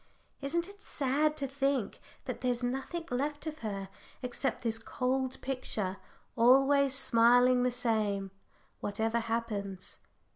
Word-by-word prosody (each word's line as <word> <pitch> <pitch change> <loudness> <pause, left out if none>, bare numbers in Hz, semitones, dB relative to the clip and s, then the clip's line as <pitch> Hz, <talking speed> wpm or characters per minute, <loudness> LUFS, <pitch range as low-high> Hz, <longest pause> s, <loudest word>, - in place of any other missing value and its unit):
Isn't 335 +5 0
it 405 0 -13
sad 300 +3 0
to 275 - -2
think 275 -4 -1 0.3
that - - -5
there's 245 -1 0
nothing 270 +7 -3
left 290 +4 -2
of 310 0 -5
her 200 -3 -4 0.4
except 250 +2 -2
this 225 -1 0
cold 260 +2 -1
picture, 220 -7 -2 0.4
always 270 +3 +5
smiling 245 0 +5
the 250 - +3
same, 215 -5 0 0.5
whatever 225 +3 0
happens?" 220 -5 -4
250 Hz, 120 wpm, -31 LUFS, 225-275 Hz, 0.5 s, always